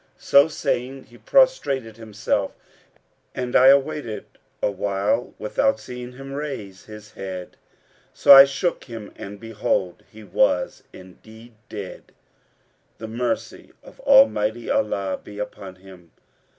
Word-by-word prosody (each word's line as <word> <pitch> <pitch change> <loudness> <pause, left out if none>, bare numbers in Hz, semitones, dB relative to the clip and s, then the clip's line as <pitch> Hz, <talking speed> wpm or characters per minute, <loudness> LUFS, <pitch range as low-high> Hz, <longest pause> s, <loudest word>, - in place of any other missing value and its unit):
[FN#471] - - -24
So 140 +2 +6
saying, 135 -3 -3
he 120 - -18
prostrated 135 - +1
himself, 110 -2 -2 0.8
and 125 -1 -4
I 130 - +7
awaited 140 -5 +2 0.3
awhile 100 +3 -1
without 110 +1 0
seeing 125 +2 -9
him 135 +2 -9
raise 135 -10 -6
his 105 -1 -12
head; 95 -2 -8 0.6
so - - +7
I 135 0 +11
shook 140 +6 -2
him 115 -4 -9
and 100 +1 -9
behold, 105 -5 -2
he 110 0 -13
was 90 -2 0
indeed 110 +6 -15 0.2
dead, 100 -4 -9 0.8
the 110 - -7
mercy 120 +2 -4
of - - -16
Almighty 120 - +3
Allah 100 -2 -1
be 105 - -11
upon 100 -2 -7
him! 90 -2 -16
110 Hz, 125 wpm, -23 LUFS, 100-135 Hz, 0.8 s, I